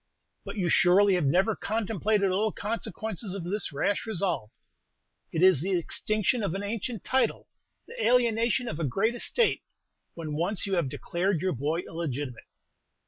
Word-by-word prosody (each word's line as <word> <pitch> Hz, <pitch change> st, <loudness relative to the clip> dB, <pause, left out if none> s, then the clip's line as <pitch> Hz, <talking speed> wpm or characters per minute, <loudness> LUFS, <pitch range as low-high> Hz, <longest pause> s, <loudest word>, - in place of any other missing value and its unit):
"But -, -, -7 dB
you 185 Hz, -3 st, 0 dB
surely 190 Hz, +3 st, +5 dB
have 175 Hz, -6 st, +2 dB
never 190 Hz, +9 st, +3 dB
contemplated 210 Hz, -2 st, 0 dB
all 210 Hz, +4 st, +1 dB
the -, -, -11 dB
consequences 215 Hz, -2 st, -4 dB
of 195 Hz, -, -5 dB
this 195 Hz, +2 st, -2 dB
rash 200 Hz, +10 st, -1 dB
resolve. 180 Hz, -, -1 dB, 0.8 s
It 165 Hz, -, 0 dB
is 185 Hz, -7 st, +6 dB
the 185 Hz, +1 st, +1 dB
extinction 215 Hz, +7 st, 0 dB
of 195 Hz, -4 st, -1 dB
an 195 Hz, -, -3 dB
ancient 220 Hz, +1 st, -4 dB
title, 260 Hz, 0 st, 0 dB, 0.4 s
the 475 Hz, 0 st, -6 dB
alienation 240 Hz, 0 st, +2 dB
of 155 Hz, -, -4 dB
a -, -, -1 dB
great 195 Hz, -, +1 dB
estate, 450 Hz, -, +1 dB, 0.5 s
when 160 Hz, -3 st, -5 dB
once 175 Hz, +7 st, -1 dB
you 195 Hz, -, -2 dB
have 170 Hz, -7 st, +1 dB
declared 175 Hz, +5 st, -1 dB
your 185 Hz, -1 st, 0 dB
boy 150 Hz, +6 st, -1 dB
illegitimate." 145 Hz, -8 st, -5 dB
195 Hz, 160 wpm, -28 LUFS, 170-220 Hz, 0.8 s, is